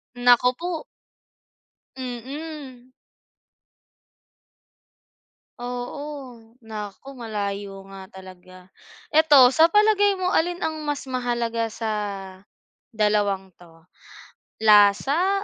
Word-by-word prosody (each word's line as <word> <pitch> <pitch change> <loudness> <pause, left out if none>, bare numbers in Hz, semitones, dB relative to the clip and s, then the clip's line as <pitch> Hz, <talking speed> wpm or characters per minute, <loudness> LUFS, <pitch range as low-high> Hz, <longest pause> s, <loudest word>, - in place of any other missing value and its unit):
Naku 245 +1 +4
po. 340 0 -5 1.1
Mm. 260 +1 -8 2.7
Oo, 250 +2 -6 0.2
naku 220 +4 -9
malayo 200 -4 -5
nga 195 -1 -11
talaga. 185 -1 -14 0.4
Ito 300 -5 +6
sa 325 +1 +5
palagay 410 -2 +3
mo, 365 - 0
alin 350 +2 +1
ang 315 -2 -3
mas 290 -2 -4
mahalaga 235 -3 -2
sa 225 -1 -3 1.0
dalawang 205 -4 0
'to, 165 -1 -20 0.8
lasa 275 - +4
245 Hz, 80 wpm, -23 LUFS, 205-300 Hz, 2.7 s, Ito